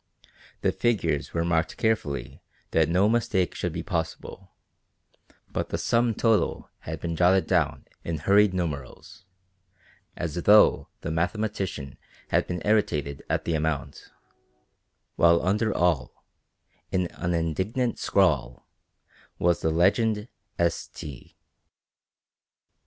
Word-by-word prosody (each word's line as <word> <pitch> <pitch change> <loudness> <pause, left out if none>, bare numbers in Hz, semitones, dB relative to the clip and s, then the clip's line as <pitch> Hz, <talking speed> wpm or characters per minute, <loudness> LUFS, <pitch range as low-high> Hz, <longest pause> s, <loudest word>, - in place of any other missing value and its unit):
The - - +2
figures 85 - 0
were 85 0 -1
marked 80 -1 0
carefully 75 - -1 0.3
that 80 -1 +3
no 90 +4 +3
mistake 105 -5 +1
should 90 - -3
be 85 +1 -5
possible, 85 +3 -4 1.0
but - - -3
the - - -2
sum 115 -1 +1
total 115 -1 +1
had 80 0 -6
been 85 -1 -3
jotted 90 +3 +4
down - - 0 0.2
in 85 -1 -3
hurried 100 +6 +4
numerals, 85 -1 -5 0.9
as 85 -4 -3
though 105 +5 +5
the 80 - -4
mathematician 85 -5 -2 0.3
had - - +1
been 90 -1 -4
irritated 75 -10 0
at - - -1
the 85 - -1
amount, 80 -2 -3 1.1
while 85 0 +5
under 105 +4 +1
all, 85 -9 0 0.7
in 90 -1 +1
an 85 0 -1
indignant 95 - -1
scrawl, 70 -11 +1 0.7
was 85 -1 +1
the 80 - +1
legend 105 +6 +2 0.3
"S. 85 0 0
T." 70 -5 -10
85 Hz, 115 wpm, -26 LUFS, 80-105 Hz, 1.1 s, though